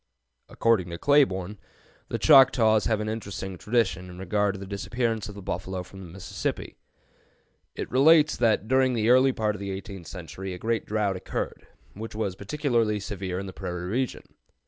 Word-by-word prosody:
] -, -, -48 dB
According 110 Hz, -6 st, +1 dB
to 85 Hz, -, -5 dB
Claiborne, 105 Hz, -8 st, +2 dB, 0.5 s
the -, -, -2 dB
Choctaws 110 Hz, -5 st, +6 dB
have 110 Hz, -2 st, +1 dB
an 105 Hz, -, -3 dB
interesting 100 Hz, -3 st, -5 dB
tradition 90 Hz, -3 st, 0 dB
in 90 Hz, -, -10 dB
regard 100 Hz, +2 st, 0 dB
to -, -, -7 dB
the 100 Hz, -, -7 dB
disappearance 110 Hz, +2 st, -2 dB
of 105 Hz, -, -9 dB
the 100 Hz, -, -9 dB
buffalo 90 Hz, 0 st, -4 dB
from 95 Hz, -1 st, -11 dB
Mississippi. 95 Hz, +1 st, -4 dB, 1.0 s
It -, -, -5 dB
relates 150 Hz, +3 st, +5 dB
that 110 Hz, -3 st, +2 dB
during 130 Hz, +1 st, +3 dB
the 115 Hz, +1 st, +2 dB
early 130 Hz, +1 st, +6 dB
part 110 Hz, -3 st, -1 dB
of 105 Hz, -, -8 dB
the 100 Hz, 0 st, -5 dB
eighteenth 95 Hz, -2 st, -7 dB
century 95 Hz, +1 st, -7 dB
a -, -, -8 dB
great 115 Hz, +4 st, -2 dB
drought 105 Hz, -3 st, 0 dB
occurred, -, -, -5 dB, 0.3 s
which 110 Hz, +2 st, -8 dB
was 105 Hz, -4 st, -1 dB
particularly 115 Hz, -2 st, 0 dB
severe 95 Hz, -2 st, -4 dB
in 100 Hz, -, -4 dB
the 95 Hz, -, -8 dB
prairie 90 Hz, -1 st, -5 dB
region. 130 Hz, +2 st, -2 dB
105 Hz, 175 wpm, -26 LUFS, 95-115 Hz, 1.0 s, Choctaws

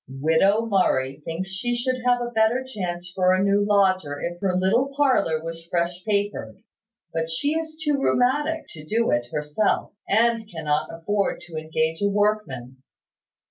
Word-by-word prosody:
"Widow 160 Hz, +11 st, +2 dB
Murray 140 Hz, -10 st, +1 dB
thinks 185 Hz, +4 st, -4 dB
she 240 Hz, +5 st, -1 dB
should 255 Hz, +1 st, -1 dB
have 245 Hz, -1 st, +3 dB
a 240 Hz, 0 st, -3 dB
better 225 Hz, +3 st, +2 dB
chance 180 Hz, -8 st, -5 dB
for 185 Hz, -1 st, +3 dB
a 185 Hz, -, +1 dB
new 200 Hz, +1 st, +3 dB
lodger 185 Hz, -8 st, +2 dB
if 175 Hz, 0 st, -4 dB
her 190 Hz, -2 st, +1 dB
little 225 Hz, +9 st, +2 dB
parlour 255 Hz, -, +2 dB
was 165 Hz, 0 st, -7 dB
fresh 175 Hz, +1 st, -1 dB
papered; 205 Hz, -, -2 dB, 0.5 s
but 160 Hz, 0 st, -1 dB
she 225 Hz, -, 0 dB
is 315 Hz, 0 st, -3 dB
too 295 Hz, -3 st, 0 dB
rheumatic 295 Hz, +6 st, +1 dB
to 155 Hz, -3 st, -10 dB
do 225 Hz, +9 st, +1 dB
it 120 Hz, 0 st, 0 dB
herself, 150 Hz, +7 st, 0 dB, 0.2 s
and 225 Hz, +1 st, +2 dB
cannot 155 Hz, -4 st, -1 dB
afford 200 Hz, +5 st, -1 dB
to 175 Hz, -2 st, -11 dB
engage 160 Hz, +1 st, -1 dB
a 200 Hz, -, +3 dB
workman. 200 Hz, -, -1 dB
190 Hz, 160 wpm, -24 LUFS, 165-230 Hz, 0.5 s, have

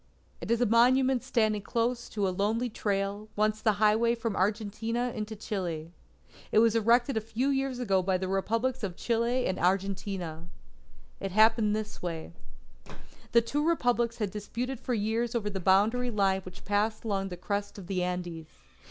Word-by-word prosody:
It -, -, -6 dB
is 235 Hz, 0 st, +2 dB
a -, -, +5 dB
monument 250 Hz, +3 st, +4 dB
standing 220 Hz, -5 st, +1 dB
close 235 Hz, +3 st, -1 dB
to 205 Hz, -3 st, -1 dB
a 185 Hz, -, -1 dB
lonely 220 Hz, +5 st, 0 dB
trail, 200 Hz, 0 st, -2 dB
once 215 Hz, +1 st, +1 dB
the 215 Hz, -, +3 dB
highway 215 Hz, +3 st, +3 dB
from 230 Hz, -3 st, -3 dB
Argentina 220 Hz, +4 st, -1 dB
into 220 Hz, 0 st, -4 dB
Chile. 175 Hz, -7 st, -4 dB, 0.6 s
It -, -, +2 dB
was 225 Hz, 0 st, +5 dB
erected 235 Hz, +3 st, +3 dB
a -, -, +1 dB
few 225 Hz, +5 st, -1 dB
years 270 Hz, -2 st, 0 dB
ago 195 Hz, -7 st, +1 dB
by 185 Hz, 0 st, +1 dB
the 185 Hz, +1 st, -3 dB
Republics 230 Hz, +7 st, 0 dB
of 190 Hz, -5 st, -3 dB
Chile 235 Hz, +4 st, 0 dB
and 185 Hz, -, -1 dB
Argentina. 185 Hz, -3 st, -1 dB, 0.7 s
It 195 Hz, -, -4 dB
happened 215 Hz, 0 st, +4 dB
this 215 Hz, 0 st, -5 dB
way: 170 Hz, -1 st, -5 dB, 1.0 s
The 235 Hz, -, +7 dB
two 285 Hz, +6 st, -1 dB
Republics 245 Hz, -8 st, +1 dB
had 210 Hz, -4 st, -2 dB
disputed 230 Hz, +5 st, -4 dB
for 250 Hz, -, -2 dB
years 225 Hz, +3 st, -1 dB
over 210 Hz, -3 st, -1 dB
the 195 Hz, -, -3 dB
boundary 210 Hz, +7 st, +3 dB
line 195 Hz, -3 st, +1 dB
which 185 Hz, -1 st, -12 dB
passed 210 Hz, +2 st, 0 dB
along 195 Hz, -3 st, -1 dB
the 180 Hz, -, -7 dB
crest 200 Hz, +3 st, -3 dB
of 195 Hz, -, -8 dB
the 185 Hz, 0 st, -2 dB
Andes. 175 Hz, -3 st, -3 dB
215 Hz, 170 wpm, -29 LUFS, 195-235 Hz, 1.0 s, The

